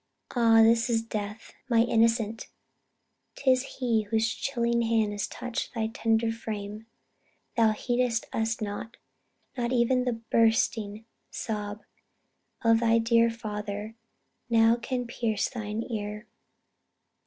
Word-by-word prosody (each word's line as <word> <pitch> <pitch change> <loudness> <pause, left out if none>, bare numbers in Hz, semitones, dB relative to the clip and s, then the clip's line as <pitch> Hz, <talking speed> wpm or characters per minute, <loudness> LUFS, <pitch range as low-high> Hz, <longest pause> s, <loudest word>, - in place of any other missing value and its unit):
"Ah 225 -2 +6
this 230 +2 +4
is 225 -1 +1
death, 210 -1 -6 0.2
my 230 -2 +5
innocent! 225 -1 +1 0.9
'tis 260 -2 +3 0.2
he 235 -4 +1
Whose 225 +1 +1
chilling 235 -3 0
hand 225 -2 +1
has 205 -1 -2
touched 245 0 -5
thy 220 -1 -1
tender 225 0 +1
frame. 215 -1 -6 0.7
Thou 225 -2 +4
heed'st 240 0 0
us 225 0 -1
not; 210 +2 -5 0.6
not 240 -1 -1
e'en 250 +1 +2
the 240 -2 -1
bursting 225 -1 +2 0.2
sob 210 -1 -4 0.8
Of 230 -1 +5
thy 230 0 +3
dear 230 0 +4
father, 210 -2 -5 0.6
now 225 0 +5
can 245 +1 -3
pierce 230 -3 -1
thine 220 -2 -4
ear. 210 0 -4
225 Hz, 120 wpm, -28 LUFS, 215-235 Hz, 0.9 s, Ah